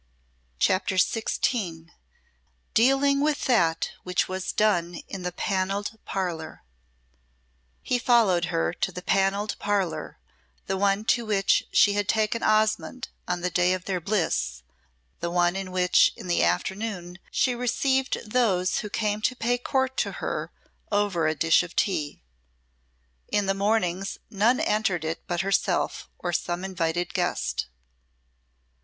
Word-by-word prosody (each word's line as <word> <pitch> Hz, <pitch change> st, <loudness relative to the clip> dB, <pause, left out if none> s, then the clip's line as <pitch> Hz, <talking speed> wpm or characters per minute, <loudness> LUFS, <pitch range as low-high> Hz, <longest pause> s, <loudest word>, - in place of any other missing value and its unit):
CHAPTER 190 Hz, -, +1 dB
XVI 185 Hz, -4 st, 0 dB, 0.8 s
Dealing 270 Hz, +4 st, +4 dB
with 300 Hz, 0 st, 0 dB
that 170 Hz, -10 st, +2 dB
which 180 Hz, 0 st, 0 dB
was 185 Hz, 0 st, -3 dB
done 175 Hz, -5 st, +1 dB
in 195 Hz, -, -6 dB
the 180 Hz, 0 st, -3 dB
Panelled 195 Hz, +4 st, -2 dB
Parlour 175 Hz, -5 st, -4 dB, 1.2 s
He 250 Hz, -, 0 dB
followed 220 Hz, -8 st, +3 dB
her 165 Hz, -1 st, -1 dB
to 190 Hz, -, -2 dB
the 180 Hz, 0 st, -8 dB
Panelled 195 Hz, +2 st, +1 dB
Parlour, 200 Hz, -4 st, -1 dB, 0.5 s
the 195 Hz, -, -1 dB
one 200 Hz, +2 st, +1 dB
to 235 Hz, +1 st, +2 dB
which 205 Hz, -3 st, +2 dB
she 205 Hz, -, +5 dB
had 205 Hz, -1 st, -1 dB
taken 220 Hz, +1 st, +1 dB
Osmonde 215 Hz, +3 st, +1 dB, 0.2 s
on 180 Hz, -1 st, -1 dB
the 180 Hz, +1 st, -1 dB
day 180 Hz, +1 st, +3 dB
of 185 Hz, -1 st, -4 dB
their 185 Hz, -2 st, -2 dB
bliss, 155 Hz, -, -1 dB, 0.6 s
the 170 Hz, -, -2 dB
one 175 Hz, +1 st, +2 dB
in 195 Hz, -1 st, -4 dB
which 180 Hz, 0 st, +4 dB
in -, -, -10 dB
the 175 Hz, -, +2 dB
afternoon 180 Hz, -, -2 dB
she 255 Hz, -, +1 dB
received 260 Hz, +2 st, 0 dB
those 195 Hz, -7 st, +2 dB
who 210 Hz, -, -5 dB
came 210 Hz, 0 st, -1 dB
to 255 Hz, -, +1 dB
pay 245 Hz, 0 st, +1 dB
court 265 Hz, +1 st, -1 dB
to -, -, 0 dB
her -, -, -4 dB, 0.4 s
over 200 Hz, -6 st, +1 dB
a 155 Hz, -, 0 dB
dish 165 Hz, 0 st, +4 dB
of 175 Hz, -1 st, -8 dB
tea. 150 Hz, -, -1 dB, 1.0 s
In 205 Hz, -1 st, 0 dB
the 195 Hz, -, +1 dB
mornings 195 Hz, -2 st, 0 dB
none 220 Hz, +5 st, +3 dB
entered 195 Hz, -6 st, 0 dB
it 160 Hz, +1 st, -3 dB
but 175 Hz, -2 st, 0 dB
herself 195 Hz, +1 st, 0 dB
or 175 Hz, -1 st, -3 dB
some 175 Hz, +2 st, -2 dB
invited 175 Hz, -2 st, -2 dB
guest. -, -, -1 dB
195 Hz, 140 wpm, -26 LUFS, 175-215 Hz, 1.2 s, she